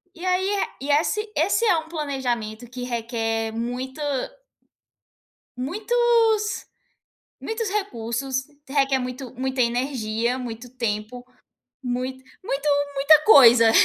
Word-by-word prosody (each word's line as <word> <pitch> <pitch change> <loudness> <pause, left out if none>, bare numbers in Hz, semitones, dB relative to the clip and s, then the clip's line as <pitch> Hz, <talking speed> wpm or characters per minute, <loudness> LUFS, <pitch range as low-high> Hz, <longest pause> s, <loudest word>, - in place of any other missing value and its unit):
E 345 - -11
aí, 370 +1 +1
eh, 405 -1 0
e 275 - -5
esse 425 +9 +1
esse 390 +9 +2
é 380 - +4
um 320 0 -10
planejamento 245 -7 -3
que 250 0 -7
requer 225 -2 -2
muito 245 +4 -4 1.6
muitos, 440 - +1 0.8
muitos 445 -1 -3
recursos, 265 - -2 0.2
requer 275 -1 +2
muito 255 0 -6
muita 260 +1 -1
energia, 240 -1 -1
muito 245 0 -7
tempo, 230 +1 -3 0.6
muito 255 +1 -3 0.2
muito 290 -3 -1 0.3
muita 300 +3 +6
coisa. 240 - +8
260 Hz, 110 wpm, -23 LUFS, 240-320 Hz, 1.6 s, coisa